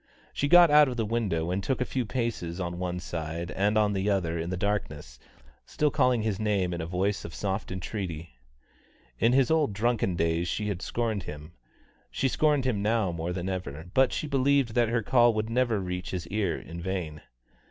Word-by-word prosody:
She 145 - 0
got 175 +1 +7
out 150 0 +7
of 125 -2 -4
the 115 - 0
window 100 -7 -1
and 95 +2 -1
took 135 - -1
a 125 - 0
few 125 -3 -2
paces 115 -9 -3
on 85 -1 -4
one 90 -1 -2
side 85 0 -5
and 105 +2 +1
on 105 -1 +3
the 100 +1 0
other 90 -5 0
in 85 +1 -3
the 90 - -2
darkness, 75 -11 -3 0.4
still 150 -1 0
calling 125 -4 +2
his 105 -4 -1
name 100 -4 0
in 85 - -3
a 80 - -4
voice 95 +3 -1
of 85 - -8
soft 100 0 -3
entreaty. 85 - -5 0.8
In 115 +2 +3
his 135 +1 +3
old 155 -9 +2
drunken 105 -3 0
days 85 +1 0
she 105 +2 -2
had 95 -3 -3
scorned 115 -3 -2
him. 75 0 -9 0.6
She 135 - 0
scorned 145 0 +2
him 115 -6 0
now 110 -3 +1
more 85 +1 -3
than 90 0 -4
ever, 90 -3 -5
but 130 -1 +4
she - - -2
still 140 -3 0
believed 135 -3 +2
that 120 -2 +2
her 115 -1 0
call 120 -1 +4
would 110 +1 -2
never 120 -3 +1
reach 90 -1 -4
his 90 -3 -4
ear 100 -4 0
in 85 +1 -8
vain. 85 -5 -4
100 Hz, 205 wpm, -28 LUFS, 85-120 Hz, 0.8 s, got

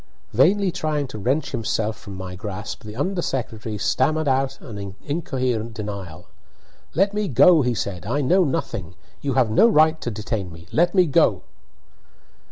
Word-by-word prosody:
Vainly 185 - +4
trying 150 -3 -1
to 110 - -7
wrench 135 +9 0
himself 110 -1 -1
from 100 -1 -10
my 95 -1 -6
grasp, 105 +3 -6
the 105 0 -8
under 180 +8 -1
secretary 110 -6 -3
stammered 155 +8 +1
out 135 0 +1
an 100 -6 -8
incoherent 130 -7 -2
denial. 100 -6 -6 0.7
"Let 195 +4 +3
me 210 -1 -1
go," 150 +4 +6
he 125 -2 0
said. 95 -4 -4
"I 145 +6 0
know 180 +8 +4
nothing 105 - -3 0.3
you 140 -2 -1
have 125 -5 +3
no 220 - +6
right 155 -4 +4
to - - -2
detain 105 -3 -4
me 85 +1 -12
let 175 +3 +2
me 185 -2 +6
go!" 145 - +3
125 Hz, 165 wpm, -23 LUFS, 105-155 Hz, 0.7 s, go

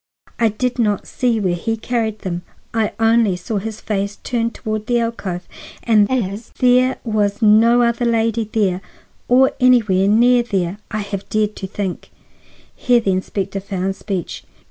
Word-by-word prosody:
I 230 -1 +4
did 250 +4 -2
not 210 -4 +1
see 240 -3 0
where 185 -4 0
he 225 +6 -2
carried 220 -2 -2
them; 175 -3 -3 0.3
I 225 -2 0
only 225 -3 +3
saw 190 +5 -4
his 215 +2 -6
face 200 -1 -2
turned 230 -1 -1
toward 215 -1 -4
the 240 -1 +2
alcove; 200 -6 -4 0.4
and 210 -3 +4
as 215 -3 -2
there 255 +1 +3
was 210 -2 0
no 230 +3 +5
other 235 +1 +1
lady 230 -1 +1
there, 195 -4 0 0.5
or 260 +2 +5
anywhere 220 -7 +4
near 240 +4 +5
there, 195 -4 -2
I 215 -1 -3
have 200 -1 -6
dared 215 -1 0
to 190 - -5
think—" 190 -2 -5 0.7
Here 245 -1 +3
the 200 -4 0
inspector 190 +1 -2
found 190 0 -3
speech. 195 -3 -5
215 Hz, 160 wpm, -19 LUFS, 195-235 Hz, 0.7 s, no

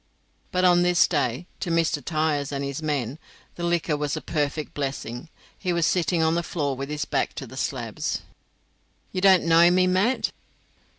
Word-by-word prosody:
But 185 0 +2
on 175 -1 +5
this 175 0 +4
day, 145 -1 -1
to 190 -2 -3
Mr. 165 -3 +1
Tyers 155 -2 0
and 140 -1 -3
his 140 +2 -4
men, 145 -3 -2 0.3
the - - -9
liquor 170 -2 +1
was 150 +1 -2
a - - -2
perfect 150 -1 -2
blessing. 135 -1 -4 0.3
He 185 - -2
was 170 -2 +2
sitting 175 -2 +1
on 160 0 +3
the 170 - +1
floor 145 -5 -2
with 135 +2 -5
his 150 -2 -2
back - - -1
to - - -5
the - - -12
slabs. - - -3 0.9
"You 185 - -2
don't 190 -2 +6
know 165 +1 +6
me, 185 +1 +4
Mat?" 190 +8 +1
160 Hz, 180 wpm, -25 LUFS, 145-175 Hz, 0.9 s, don't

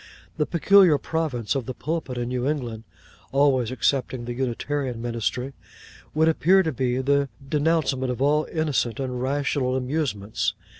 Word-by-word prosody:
The 150 - +1
peculiar 180 -2 +5
province 140 -8 -2
of 135 -5 -3
the 130 - -4
Pulpit 155 -4 -3
in 120 0 -2
New 125 +1 -1
England 120 -7 -3 0.5
(always 135 -4 +3
excepting 130 -2 0
the 120 - -4
Unitarian 130 0 -2
Ministry) 120 +3 -2 0.6
would 160 +1 +4
appear 180 +4 +4
to 160 - -1
be 125 -2 -1
the 140 +1 +1 0.2
denouncement 145 -3 +1
of 125 - -4
all 150 +3 +2
innocent 140 -8 0
and 125 -2 -3
rational 135 -1 0
amusements. 125 -6 -1
135 Hz, 145 wpm, -24 LUFS, 125-150 Hz, 0.6 s, peculiar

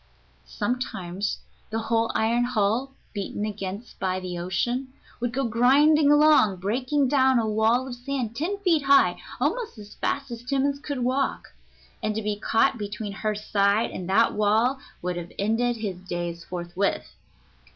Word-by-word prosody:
Sometimes 200 -5 -3 0.3
the 220 - -2
whole 225 0 0
iron 235 +2 +2
hull, 245 +3 0 0.2
beaten 205 0 -3
against 205 +1 -6
by 185 -1 -1
the 180 -1 -5
ocean, 240 +9 -2 0.3
would 240 0 -1
go 270 +3 -1
grinding 280 +6 +4
along, 295 -9 +5
breaking 255 +9 0
down 265 -1 +4
a 225 -2 +1
wall 220 +4 +2
of 255 - -5
sand 245 -2 -4
ten 345 +10 -2
feet 340 -6 +3
high, 275 0 +4 0.2
almost 475 - -1
as 210 -1 -11
fast 275 -2 -2
as 235 -1 -6
Timmans 275 +2 0
could 280 -4 -3
walk. 260 +2 -1 0.5
And 215 -1 -1
to 220 - -2
be 210 0 -1
caught 225 +1 +2
between 205 0 -4
her 215 +1 -2
side 205 +1 +1
and 180 0 -6
that 225 +4 +4
wall 220 +6 +2 0.2
would 180 0 -2
have 175 0 -6
ended 225 +4 +1
his 205 -5 -4
days 175 -2 -5
forthwith. 180 +2 -2
225 Hz, 155 wpm, -25 LUFS, 200-260 Hz, 0.5 s, along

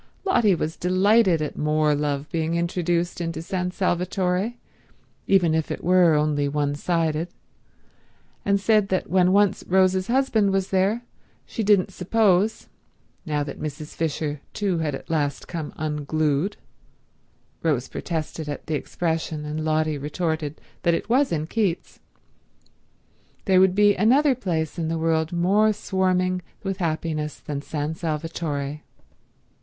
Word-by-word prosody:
Lotty 235 - +4
was 160 -1 -3
delighted 185 -1 +3
at 150 - -4
more 150 0 +2
love 145 0 -1
being 165 0 -1
introduced 170 0 -1
into 165 -1 -3
San 180 0 -2
Salvatore, 185 +3 0 0.7
even 180 -5 +4
if 160 -1 0
it - - -5
were 180 -2 +5
only 150 -1 +1
one 145 0 0
sided, 160 +1 0 1.2
and 200 0 +2
said 210 0 +3
that 185 -1 -2
when 185 -1 +4
once 200 0 +3
Rose's 185 0 +3
husband 235 -5 +2
was 195 0 -1
there 200 +5 +1 0.4
she - - -4
didn't 200 -2 +3
suppose, 200 +2 +2 0.6
now 150 -1 0
that 140 - -7
Mrs. 150 0 -6
Fisher 150 -2 -2
too 195 -5 0
had 150 -3 -1
at - - -10
last 145 -3 -1
come 160 -4 -5
unglued—Rose 150 - -3
protested 160 -2 -4
at 145 - -5
the 160 - -3
expression, 160 0 -2
and 155 +1 -3
Lotty 155 -1 0
retorted 155 0 -3 0.2
that 170 -1 +3
it - - -5
was 265 +4 +3
in 155 -2 -1
Keats—there 190 0 -5
would 185 -1 +4
be 205 0 +5
another 260 +9 +4
place 170 -9 -2
in 165 - -1
the 165 +1 -1
world 160 0 +1
more 195 +5 +3
swarming 185 -3 0 0.2
with 195 -1 -2
happiness 155 -3 -2
than 145 -1 -5
San 150 +1 -3
Salvatore. 150 -3 -3
170 Hz, 135 wpm, -24 LUFS, 155-190 Hz, 1.2 s, were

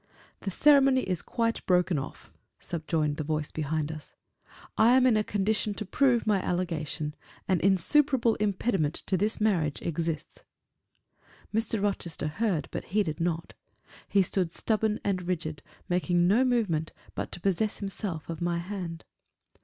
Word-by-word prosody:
"The 200 - -4
ceremony 275 +3 +5
is 180 -3 -1
quite 230 -1 -1
broken 180 -3 +3
off," 135 - -8 0.3
subjoined 155 -3 -1
the 155 - -2
voice 150 0 -2
behind 155 0 -2
us. 155 -2 -10 0.6
"I 230 +3 +5
am 255 - +4
in 250 -3 +5
a 215 - +2
condition 210 +1 0
to 215 - -4
prove 245 +3 +2
my 205 -3 +2
allegation; 160 -5 -2 0.3
an 185 -3 +2
insuperable 235 - +3
impediment 195 -6 0
to 190 - -2
this 210 +4 0
marriage 175 -9 +1
exists." 165 -1 -3 1.1
Mr. 225 0 0
Rochester 170 -6 -2
heard, 190 -1 -1
but - - -4
heeded 185 -6 0
not; 170 -1 -2 0.6
he 200 -1 +4
stood 185 -1 0
stubborn 215 +4 0
and 185 -3 -1
rigid; 160 -5 -2 0.3
making 175 -1 +2
no 220 +7 +4
movement 210 -12 0 0.2
but - - -4
to - - -3
possess 200 +3 0
himself 195 -5 -5
of 165 -1 -6
my 170 0 0
hand. 175 -2 -5
185 Hz, 145 wpm, -28 LUFS, 165-215 Hz, 1.1 s, ceremony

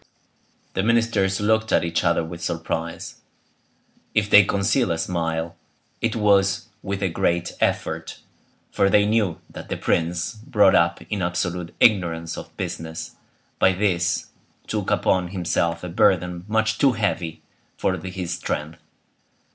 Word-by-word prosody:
The 95 - 0
ministers 110 -3 +2
looked 110 +1 +1
at - - +3
each 85 0 -1
other 85 -1 +2
with 85 +1 -8
surprise. 80 0 -4 1.0
If 105 -1 +1
they 105 - +9
concealed 100 +5 +1
a 85 - 0
smile 80 -1 -2 0.5
it 115 -1 0
was 100 -1 +2
with 100 0 -3
a - - +3
great 85 0 0
effort, - - -1 0.5
for 100 - +2
they 105 +1 +4
knew 105 -6 +1
that - - -10
the - - -2
prince, 85 0 0
brought 105 -3 +3
up 85 0 +2
in 105 -3 -1
absolute 90 -1 -2
ignorance 85 -6 +2
of - - -10
business, 80 0 -5 0.5
by 95 - +5
this 90 -2 0 0.3
took - - -2
upon 90 -1 +2
himself 85 -2 -1
a - - -4
burden 90 -1 +1
much 110 0 +1
too 135 -3 +4
heavy 90 -7 -2 0.3
for 95 - 0
his 90 0 -5
strength. 75 +2 -4
90 Hz, 140 wpm, -23 LUFS, 85-105 Hz, 1.0 s, they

